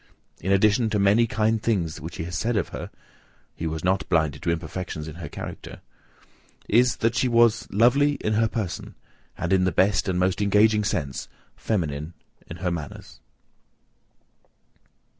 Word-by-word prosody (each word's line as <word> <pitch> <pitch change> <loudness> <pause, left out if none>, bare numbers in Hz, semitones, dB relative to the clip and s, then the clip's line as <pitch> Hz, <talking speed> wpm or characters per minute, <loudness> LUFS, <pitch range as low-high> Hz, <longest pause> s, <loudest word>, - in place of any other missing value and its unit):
In 95 - -2
addition 110 +4 +3
to 110 - 0
many 105 +4 +4
kind 110 0 +1
things 95 -9 -1
he - - -5
has 85 +1 -5
said 115 +7 0
of - - -1
her, - - -6 0.7
(he 80 - -4
was 80 0 -4
not 95 +1 0
blinded 80 -5 +1
to - - -2
imperfections 85 -1 -4
in 80 +1 -8
her 85 -5 -7
character) - - -8 0.9
is, 120 +3 +4
that 115 0 0
she 120 +2 +1
was 115 -1 +3
"Lovely 130 +7 +4
in 110 -6 -2
her 110 +1 +3
person, 105 -6 -5 0.4
and - - -1
in 95 -1 +3
the 95 - +2
best 95 +3 +2
and 90 - 0
most 90 +2 +1
engaging 105 +1 +4
sense 75 -9 -2 0.3
feminine 80 -5 -3 0.3
in 85 - -7
her 90 - +1
manners." 80 -4 -7
100 Hz, 160 wpm, -25 LUFS, 85-110 Hz, 0.9 s, many